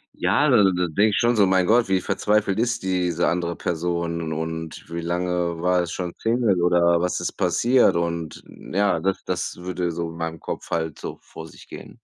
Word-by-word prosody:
Ja, 105 +12 +2
d 125 - +5 0.2
da 90 0 0
denke 100 +7 +2
ich - - 0
schon 120 0 +2
so: 100 -2 +5
„Mein 95 -1 +3
Gott, 115 -1 +4
wie 95 -1 +1
verzweifelt 105 +1 0
ist 120 0 0
diese 90 -2 0
andere 85 0 -1
Person 85 -1 -2
und 80 0 -5
wie 85 0 -4
lange 85 0 -2
war 90 0 +2
es 85 - -6
schon 90 -1 -4
single 115 -6 +1
oder 85 -1 +4
was 90 0 -1
ist 90 - -3
passiert 110 +8 +3
und 85 -2 -3
ja, 100 -3 -1
das 95 +3 -1
das 90 -1 -3
würde 90 -1 -3
so 85 0 -4
in 80 - -10
meinem 80 -1 -4
Kopf - - -7
halt 80 -2 -2
so - - -7
vor 80 0 -11
sich - - -16
gehen. - - -11
90 Hz, 200 wpm, -23 LUFS, 85-95 Hz, 0.2 s, d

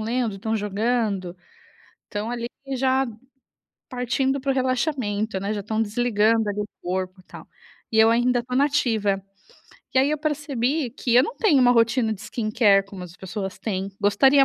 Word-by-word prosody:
lendo, 230 -1 -1
estão 220 +3 -2
jogando. 205 -3 -1 0.7
Estão 210 +3 -5
ali 235 0 -3 0.3
já 265 +1 +2 0.8
partindo 265 +2 -1
para 275 0 0
o - - +1
relaxamento, 255 -6 -1
né, 200 +2 -2
já 205 - -3
estão 220 +2 -1
desligando, 225 0 +2
ali, 205 0 -3
o 210 - -2
corpo, 185 +1 -4
tal. - - -12 0.4
E 220 - -1
eu 220 0 +7
ainda 240 +2 +3
estou 250 +1 -3
na 280 - +5
ativa. 220 -9 0 0.7
E - - +5
aí 275 +3 +2
eu 305 - 0
percebi 290 -2 -1
que 240 0 -1
eu 250 - +7
não 470 - -4
tenho 320 - +4
uma 245 - +6
rotina 230 -1 +3
de 200 - -7
skincare 215 -3 +2
como 195 -2 -9
as 175 -1 -12
pessoas 190 0 -6
têm, 195 -2 -3
gostaria 265 +7 +5
225 Hz, 170 wpm, -24 LUFS, 205-255 Hz, 0.8 s, eu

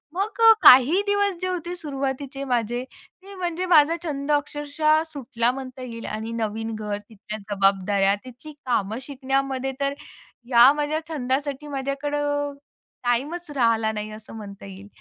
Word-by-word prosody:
मग 430 +4 -2
अ, 450 0 +9
काही 275 +10 +8
दिवस 405 -2 +2
जे 370 - 0
होते 355 -1 -3
सुरुवातीचे 275 -2 -4
माझे 240 +2 -2
ते 395 +2 -17
म्हणजे 355 0 -2
माझा 305 +2 +6
छंद 290 -2 -3
अक्षरशः 295 +1 +1
सुटला, 245 -3 0
म्हणता 260 -1 -8
येईल. 230 -2 -7
आणि 220 +2 -4
नवीन 225 0 -3
घर, 210 -1 -3
तिथल्या 210 +1 -9 0.2
जबाबदाऱ्या, 195 0 +3
तिथली 255 +5 -11
कामं 220 -3 0
शिकण्यामध्ये, 270 0 -2
तर 280 0 +1 0.6
या 245 +2 +8
माझ्या 295 +1 -1
छंदासाठी 285 0 -2
माझ्याकडं 290 +1 -2 0.5
टाईमच 295 +8 -1
राहिला 225 -3 +2
नाही, 215 0 -5
असं 220 +1 -11
म्हणता 200 -2 -9
येईल. 195 +1 -11
270 Hz, 140 wpm, -24 LUFS, 225-295 Hz, 0.6 s, अ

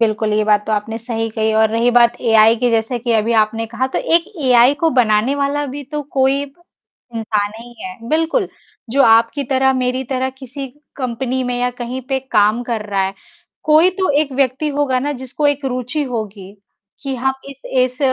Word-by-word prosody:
बिल्कुल, 215 -1 +1
ये 215 0 +2
बात 210 -1 +2
तो 220 - -1
आपने 220 +2 -2
सही 225 -1 -3
कही 220 0 0
और 220 0 +4
रही 230 +2 +2
बात 240 0 +4
एआई 225 -1 +5
की, 245 +1 +1
जैसे 230 +2 0
कि 235 0 -1
अभी 225 +1 +1
आपने 225 +1 -3
कहा 235 +3 -2
तो - - +2
एक 335 0 +2 0.2
एआई 250 +2 +5
को 325 - +4
बनाने 240 0 +2
वाला 285 +1 -1
भी 280 +2 -6
तो 300 0 -2 0.2
कोई 270 +2 +2
ब 285 +6 -22 0.5
इंसान 210 -2 -1
हीं 240 +1 -12
है। 190 +5 -8
बिल्कुल, 325 - +1 0.4
जो 275 +3 +3
आपकी 230 +5 +4
तरह 265 0 +3
मेरी 255 0 -1
तरह 260 +1 -2
किसी 270 +1 -7 0.3
कंपनी 255 0 -2
में 245 0 -2
या 250 0 +1
कहीं 245 +2 -4
पे 270 -1 +1
काम 215 +4 +3
कर 230 -3 -4
रहा 195 -1 +1
है, 190 +1 -4 0.5
कोई 315 +4 +5
तो 370 - +2
एक 285 -3 -2
व्यक्ति 270 +2 0
होगा 280 -3 0
ना 290 +3 -2
जिसको 260 +3 -2
एक 285 0 0
रुचि 255 +3 -2
होगी, 210 -6 -6 0.5
कि 275 -1 -3
हम 265 +2 0 0.2
इस 275 -1 -12
इस 255 -1 0
245 Hz, 200 wpm, -18 LUFS, 225-270 Hz, 0.5 s, एआई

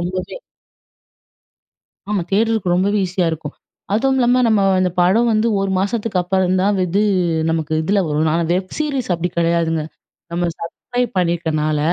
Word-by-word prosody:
ரொம்பவே. 185 - -4 1.7
ஆமா 205 -3 0
தேடுறதுக்கு 215 -3 +1
ரொம்பவே 200 +3 +1
ஈஸியா 180 0 -1
இருக்கும். 155 -2 -6 0.4
அதுவுமில்லாம 255 +1 +2
நம்ம 215 -3 +3 0.2
இந்த 185 - +2
படம் 220 +7 +3
வந்து 215 +2 +2
1 195 0 -1
மாசத்துக்கு 205 0 -1
அப்புறம் 185 +1 +1
தான் 200 0 +1
இது 185 +4 0 0.5
நமக்கு 160 -1 -1
இதில 200 +5 +1
வரும். 155 +1 +1
ஆனா 170 - +1
வெப் 185 +1 -2
சீரிஸ் 280 -7 -2
அப்டி 175 +1 -2
கிடையாதுங்க. 165 -2 +1 0.5
நம்ம 175 +1 -1
சப்ஸ்கிரைப் 245 +8 -3
பண்ணிருக்கனால, 160 -4 0
185 Hz, 135 wpm, -19 LUFS, 170-215 Hz, 1.7 s, நம்ம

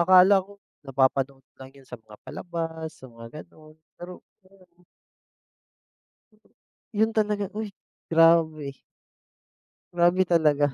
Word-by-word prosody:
akala 185 +3 +6
ko 205 - -15 0.3
napapanood 135 0 0
lang 130 0 -12
'yon 135 -2 -19
sa 125 - -8
mga 105 -1 -15
palabas, 165 -2 -6
sa 130 - -14
mga 115 -1 -12
gano'n 155 0 -17 0.2
pero 180 +1 -10 0.2
grabe. 185 -2 -25 2.1
'Yon 220 +1 +2
talaga, 210 -1 0
uy 220 -1 -3 0.4
grabe! 165 -3 +3 1.2
Grabe 175 +2 +3
talaga, 150 -5 +2
165 Hz, 105 wpm, -25 LUFS, 140-180 Hz, 2.1 s, akala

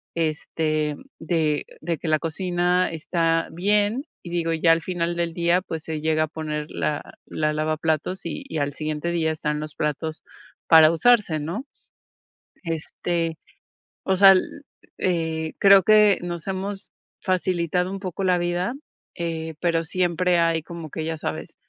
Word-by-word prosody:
este, 155 -1 -1 0.2
de 160 -3 0 0.2
de 165 +1 -2
que 165 - -6
la 155 0 +3
cocina 175 +2 0
está 165 0 0
bien, 205 - +1 0.2
y 170 - -8
digo, 165 -1 0
ya 165 +1 +4
al 165 0 +3
final 170 0 -2
del 170 -1 -1
día, 170 +1 +2
pues, 160 -4 -6
se 155 -1 -4
llega 155 0 +2
a - - -1
poner 150 -1 -5
la 150 -1 -3
la 150 -1 -1
lavaplatos 155 +3 -1
y 275 - -5
al 145 0 -1
siguiente 155 +2 -3
día 160 -2 +1
están 150 -1 -2
los 155 0 -7
platos 155 +1 -3 0.4
para 160 -1 +8
usarse, 200 -3 +3
¿no?, 170 - -4 1.0
este, 165 0 -2 0.7
o 190 - +1
sea, 195 0 +9
l 185 - +4 0.6
eh, 160 -3 -1
creo 195 -1 +7
que 210 0 +5
nos 175 -1 -5
hemos 195 +1 -4 0.3
facilitado 180 -1 0
un 195 - -5
poco 190 0 -4
la 180 -1 +3
vida, 175 +6 -1 0.4
eh, 160 -2 -4
pero 165 -2 +1
siempre 180 0 +1
hay 165 -1 +2
como 165 -1 -8
que, 160 - -5
ya 160 -1 -3
sabes, 160 +2 -5
165 Hz, 150 wpm, -24 LUFS, 155-180 Hz, 1.0 s, sea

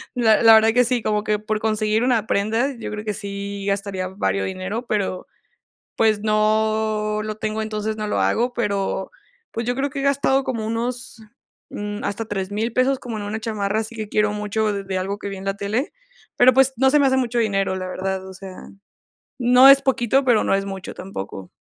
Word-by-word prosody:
La 225 -3 +4
la 225 -1 +9
verdad 220 0 +6
que 250 +1 +5
sí, 245 0 0
como 210 -1 0
que 210 0 0
por 215 0 -2
conseguir 215 0 0
una 235 -4 +1
prenda, 225 +7 +1
yo 230 - -6
creo 210 0 -5
que 215 -1 -2
sí 200 0 -6
gastaría 200 -2 -2
vario 100 - -1
dinero, 190 +6 -4
pero, 195 -3 -2 0.7
pues, 215 -2 +3
no 215 0 +1
lo 215 -1 -4
tengo, 215 0 -3
entonces 215 0 -3
no 215 -1 -3
lo 210 - -1
hago, 245 +2 +1
pero, 200 -5 -2 0.4
pues, 230 0 -4
yo 245 - 0
creo 275 +2 -1
que 275 - -5
he - - -3
gastado 275 -1 +2
como 230 -5 -3
unos, 235 +1 -4 0.5
mm, 205 0 -5
hasta 215 +2 -3
3000 205 +3 -3
pesos, 255 +2 +2
como 235 -3 -6
en 205 - -5
una 215 +2 -4
chamarra, 215 -2 -1
así 225 +1 -6
que 215 -2 -5
quiero 210 0 +1
mucho 210 +1 -1
de 200 -1 -4
de 190 -1 -2
algo 195 +2 -3
que 200 - -6
vi 195 - -6
en 190 - -9
la 195 - 0
tele. 210 +8 -2 0.4
Pero, 250 +1 +6
pues, 265 0 +3
no 265 +3 +4
se 295 - +4
me 285 - +4
hace 265 0 +3
mucho 245 -2 0
dinero, 195 -4 0
la 185 0 -4
verdad. 190 +1 -3
O 190 - -10
sea, 190 0 -10 0.8
no 250 +2 +7
es 275 0 +8
poquito, 265 0 +2
pero 240 -4 +4
no - - +2
es 195 0 -1
mucho 195 -1 -6
tampoco. 95 - -7
215 Hz, 210 wpm, -22 LUFS, 200-235 Hz, 0.8 s, la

